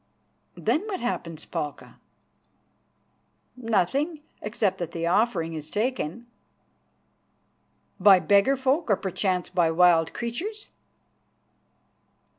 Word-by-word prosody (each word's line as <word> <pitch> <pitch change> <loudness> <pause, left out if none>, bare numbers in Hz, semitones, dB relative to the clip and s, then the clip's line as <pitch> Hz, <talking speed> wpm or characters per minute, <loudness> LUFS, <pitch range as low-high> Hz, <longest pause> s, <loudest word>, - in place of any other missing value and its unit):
"Then 315 - 0
what 385 -4 -3
happens, 165 -9 -4
Palka?" 150 -4 -6 1.6
"Nothing, 255 - 0 0.2
except 210 -3 -1
that 170 -2 -5
the 165 0 -3
offering 170 -3 +1
is 155 -1 -7
taken." 230 -1 -2 1.7
"By 195 -3 +7
beggar 200 - +3
folk, 265 +3 0
or 200 - +5
perchance 185 -1 -2
by 175 -3 +2
wild 165 -1 +4
creatures!" 370 - -5
200 Hz, 90 wpm, -26 LUFS, 170-250 Hz, 1.7 s, By